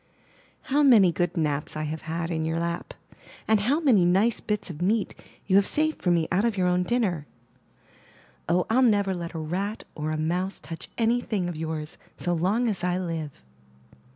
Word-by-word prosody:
How 295 Hz, 0 st, +1 dB
many 225 Hz, -11 st, +6 dB
good 175 Hz, +1 st, -1 dB
naps 150 Hz, -2 st, -1 dB
I 155 Hz, -, -2 dB
have 155 Hz, +1 st, -4 dB
had 165 Hz, +1 st, -3 dB
in 160 Hz, -1 st, -1 dB
your 160 Hz, +1 st, -1 dB
lap! 170 Hz, 0 st, -4 dB, 0.5 s
and 220 Hz, -1 st, +4 dB
how 255 Hz, +10 st, +1 dB
many 250 Hz, -, +4 dB
nice 195 Hz, +6 st, +3 dB
bits 210 Hz, -4 st, -3 dB
of 160 Hz, 0 st, -9 dB
meat 205 Hz, +3 st, +1 dB, 0.3 s
you 195 Hz, 0 st, +4 dB
have 200 Hz, -, +4 dB
saved 310 Hz, +1 st, 0 dB
for 180 Hz, -, +1 dB
me 170 Hz, -2 st, +2 dB
out 190 Hz, +3 st, +2 dB
of 230 Hz, -3 st, 0 dB
your 185 Hz, -, +2 dB
own 180 Hz, 0 st, +2 dB
dinner! 180 Hz, -, 0 dB, 1.2 s
Oh, 175 Hz, +1 st, +2 dB
FU 240 Hz, +4 st, +3 dB
never 205 Hz, -5 st, +3 dB
let 170 Hz, -2 st, -6 dB
a -, -, -3 dB
rat, 185 Hz, +7 st, -3 dB
or 155 Hz, 0 st, -4 dB
a 155 Hz, -, -1 dB
mouse, 180 Hz, +5 st, -1 dB
touch 165 Hz, +3 st, -9 dB
any 235 Hz, +1 st, +2 dB
thing 200 Hz, -7 st, -2 dB
of 175 Hz, -, -4 dB
yours 160 Hz, 0 st, -5 dB, 0.2 s
so 175 Hz, -, -1 dB
long 195 Hz, +9 st, +1 dB
as 195 Hz, -5 st, -2 dB
I 180 Hz, 0 st, +1 dB
live. 165 Hz, -, -5 dB
180 Hz, 195 wpm, -26 LUFS, 165-215 Hz, 1.2 s, many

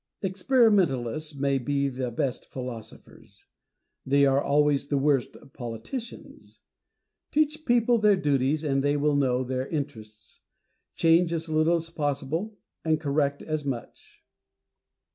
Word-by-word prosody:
Experimentalists 180 Hz, -, +2 dB
may 140 Hz, 0 st, 0 dB
be 140 Hz, +2 st, 0 dB
the 130 Hz, -2 st, -3 dB
best 120 Hz, +2 st, -3 dB
philosophers: 120 Hz, -4 st, -10 dB, 0.6 s
they 140 Hz, +1 st, +3 dB
are 135 Hz, 0 st, +3 dB
always 145 Hz, -1 st, +2 dB
the 145 Hz, -, 0 dB
worst 135 Hz, -2 st, +1 dB, 0.2 s
politicians. 120 Hz, -, -8 dB, 0.7 s
Teach 310 Hz, +1 st, 0 dB
people 240 Hz, -1 st, +3 dB
their 210 Hz, -1 st, +5 dB
duties, 145 Hz, -2 st, +1 dB
and 135 Hz, -2 st, 0 dB
they 145 Hz, +1 st, +2 dB
will 145 Hz, 0 st, +1 dB
know 130 Hz, -2 st, +1 dB
their 130 Hz, +1 st, -3 dB
interests. 110 Hz, -8 st, -7 dB, 0.6 s
Change 165 Hz, +1 st, +3 dB
as 165 Hz, 0 st, -3 dB
little 155 Hz, +2 st, +3 dB
as 165 Hz, 0 st, -4 dB
possible, 155 Hz, +7 st, -2 dB, 0.3 s
and 160 Hz, -1 st, +1 dB
correct 145 Hz, -1 st, 0 dB
as 155 Hz, -1 st, -3 dB
much. 125 Hz, -6 st, -7 dB
145 Hz, 125 wpm, -26 LUFS, 135-165 Hz, 0.7 s, their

